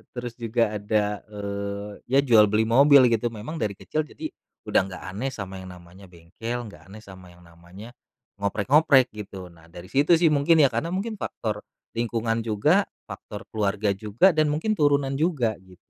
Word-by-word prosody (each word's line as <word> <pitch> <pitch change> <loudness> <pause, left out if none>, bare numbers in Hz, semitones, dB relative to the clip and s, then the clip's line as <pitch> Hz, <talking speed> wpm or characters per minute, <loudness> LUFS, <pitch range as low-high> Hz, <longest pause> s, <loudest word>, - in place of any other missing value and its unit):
Terus 120 -1 -5
juga 115 -1 0
ada, 105 0 0
eee, 100 0 -5 0.2
ya 135 +2 +3
jual 110 -5 +6
beli 105 +2 +2
mobil 130 +2 +6
gitu, 115 +1 +1
memang 115 +9 -7
dari 105 -2 -2
kecil 155 +9 -3
jadi - - -7 0.4
udah - - +3
nggak 95 - -9
aneh 130 +6 -2
sama 95 -4 -7
yang 95 - -10
namanya 90 +2 -15
bengkel, 105 +8 -6
nggak 100 - -15
aneh 110 - -10
sama 95 -2 -13
yang 90 - -20
namanya 85 +7 -13 0.5
ngoprek-ngoprek 130 +6 +3
gitu. 100 -3 -9
Nah 80 -1 -19
dari 90 +1 -11
situ 145 +5 +4
sih 165 -1 +3
mungkin 155 +3 +3
ya, - - +7
karena 115 +8 -2
mungkin 215 +2 -4
faktor 105 -2 -4 0.4
lingkungan 115 -1 -1
juga, 150 - +2 0.2
faktor 105 +1 -9
keluarga 105 -1 0
juga 110 - +3
dan 155 -1 +3
mungkin 160 +9 -1
turunan 140 -2 +2
juga, 140 - +1
gitu. 95 -1 -18
110 Hz, 175 wpm, -25 LUFS, 100-135 Hz, 0.5 s, ya